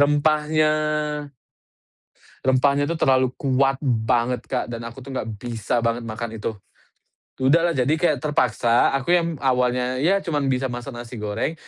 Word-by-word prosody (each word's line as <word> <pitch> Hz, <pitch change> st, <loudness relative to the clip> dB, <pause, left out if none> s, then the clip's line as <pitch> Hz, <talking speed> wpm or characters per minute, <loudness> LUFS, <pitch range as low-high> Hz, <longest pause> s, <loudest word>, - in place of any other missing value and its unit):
Rempahnya. 150 Hz, +1 st, +3 dB, 1.8 s
Rempahnya 140 Hz, +2 st, +3 dB
itu 170 Hz, -, -1 dB
terlalu 130 Hz, -2 st, +3 dB
kuat 135 Hz, 0 st, +1 dB
banget 120 Hz, -1 st, 0 dB
Kak, 125 Hz, -, -2 dB
dan 115 Hz, -1 st, -6 dB
aku 115 Hz, +3 st, -8 dB
tuh 135 Hz, +1 st, -8 dB
nggak 115 Hz, -, -3 dB
bisa 120 Hz, 0 st, -2 dB
banget 115 Hz, 0 st, -1 dB
makan 115 Hz, 0 st, -5 dB
itu. 110 Hz, +1 st, -3 dB, 0.9 s
Tu, 130 Hz, +3 st, +3 dB
dahlah, 170 Hz, +1 st, +4 dB
jadi 140 Hz, -2 st, +1 dB
kayak 155 Hz, -5 st, +3 dB
terpaksa, 125 Hz, -4 st, +2 dB
aku 135 Hz, +6 st, 0 dB
yang 170 Hz, -3 st, +1 dB
awalnya, 125 Hz, -1 st, 0 dB
ya, 190 Hz, +6 st, +3 dB
cuman 145 Hz, -4 st, 0 dB
bisa 130 Hz, 0 st, 0 dB
masak 120 Hz, +2 st, -6 dB
nasi 120 Hz, -2 st, -8 dB
goreng, 105 Hz, +9 st, -2 dB
130 Hz, 150 wpm, -23 LUFS, 120-145 Hz, 1.8 s, dahlah